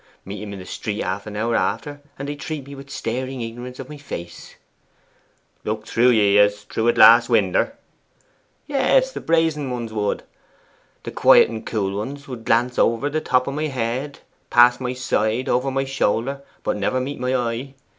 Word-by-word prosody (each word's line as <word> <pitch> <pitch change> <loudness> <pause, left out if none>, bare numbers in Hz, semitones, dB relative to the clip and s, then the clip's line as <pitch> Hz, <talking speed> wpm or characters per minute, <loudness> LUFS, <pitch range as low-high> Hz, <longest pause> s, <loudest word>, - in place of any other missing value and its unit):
Meet 100 +1 -7
'em 105 -1 -6
in - - -7
the 90 - -9
street 105 +2 -4
half 95 +3 -3
an 105 - -7
hour 115 +2 0
after, 115 +10 -2 0.2
and 140 - -5
they'd 145 0 -5
treat 150 -3 -5
me 140 - -10
with 140 0 -11
staring 130 0 -4
ignorance 120 +2 -7
of 135 - -8
my 150 - -9
face.' 85 -12 -8 1.1
'Look 110 0 -3
through 120 +3 +3
ye 105 -4 +4
as 105 0 +3
through 110 +2 -2
a 120 - +5
glass 120 +1 +7
winder?' 115 - +2 0.9
'Yes, 290 - +2
the - - -6
brazen 160 -4 +1
ones 120 -3 -4
would. 105 -2 -1 0.8
The - - -6
quiet - - +6
and 110 -1 -6
cool 100 -3 -2
ones 140 +7 -5
would 125 -4 -8
glance 120 +2 +1
over 115 +5 +2
the 155 +1 -1
top 125 -3 +2
of 140 - -3
my 155 +2 -1
head, 130 +2 -3 0.3
past 120 +1 +5
my 125 0 -2
side, 125 0 -1
over 125 +2 +1
my 135 0 -1
shoulder, 135 +1 -1 0.2
but - - -1
never 105 +6 0
meet 135 +2 -4
my 125 +1 0
eye. 125 +2 -3
125 Hz, 185 wpm, -22 LUFS, 110-140 Hz, 1.1 s, glass